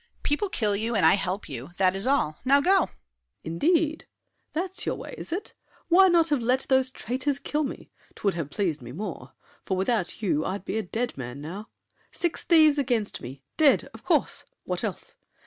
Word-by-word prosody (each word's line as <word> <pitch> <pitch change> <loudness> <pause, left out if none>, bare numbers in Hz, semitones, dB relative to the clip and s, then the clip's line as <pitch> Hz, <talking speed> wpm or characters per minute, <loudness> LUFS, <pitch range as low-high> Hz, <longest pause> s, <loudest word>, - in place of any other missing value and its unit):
People 300 +8 0
kill 210 - +1
you, 225 +3 -1
and 200 - +3
I - - +8
help 195 0 -1
you—that 175 +8 -1
is 195 +5 0
all! 210 - +1
Now 275 +2 +5
go! 380 +7 +4
SAVERNY. - - -20 0.5
Indeed! 310 - +1 0.4
That's 365 +4 -3
your - - 0
way, - - -8
is - - -9
it? 365 +5 -4 0.4
Why 380 +3 +7
not 335 -2 +4
have 290 -4 +1
let 250 +3 +2
Those 265 -1 +4
traitors 260 +3 -2
kill 300 +2 -1
me? 270 - -6 0.2
'Twould 200 -2 0
have 165 -4 -4
pleased 165 -4 -1
me 120 0 -9
more. 205 +8 -6 0.3
For 190 - -1
without 195 -1 -1
you 155 -6 +1
I'd 195 0 -4
be 220 - -1
a - - 0
dead 230 +5 -3
man 125 +1 -6
now. 180 +9 -7 0.4
Six 345 -2 -2
thieves 310 -4 +5
against 235 -6 -1
me! 135 +3 -9
Dead! 300 -4 +4
Of - - -13
course! - - +1 0.2
What - - -3
else? - - -5
230 Hz, 190 wpm, -26 LUFS, 185-295 Hz, 0.5 s, I